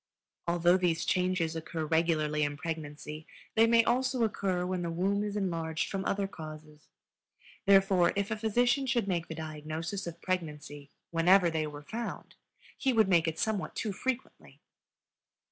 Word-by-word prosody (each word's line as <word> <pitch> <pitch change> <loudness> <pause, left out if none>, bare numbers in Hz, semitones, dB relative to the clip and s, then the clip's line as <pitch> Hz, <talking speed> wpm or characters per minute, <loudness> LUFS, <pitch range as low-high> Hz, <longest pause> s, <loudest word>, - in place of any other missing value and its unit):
Although 175 +1 +4
these 175 -3 0
changes 180 -3 +1
occur 160 0 -4
regularly 155 -1 +1
in 145 -1 0
pregnancy, 155 -1 -6 0.3
they 225 +1 +5
may 230 0 +5
also 255 +1 +1
occur 190 -4 0
when 185 0 -2
the 170 - -2
womb 195 +5 0
is 205 -1 -3
enlarged 165 -5 -1
from 195 -1 -2
other 200 0 0
causes; 155 -3 -10 0.8
therefore, 195 -2 +5
if 200 +1 -1
a - - +1
physician 245 +5 +1
should 235 -4 +1
make 175 -3 -1
the 160 - -6
diagnosis 160 +4 -5
of 170 0 -7
pregnancy 150 -6 -4 0.2
whenever 175 +1 +5
they 155 -1 -1
were 145 0 -9
found, 230 +8 -6 0.4
he 265 - +1
would 220 -4 +4
make 170 -3 +4
it 160 - -2
somewhat 220 -4 -1
too 215 - -2
frequently. 260 +6 -5
175 Hz, 155 wpm, -30 LUFS, 160-200 Hz, 0.8 s, they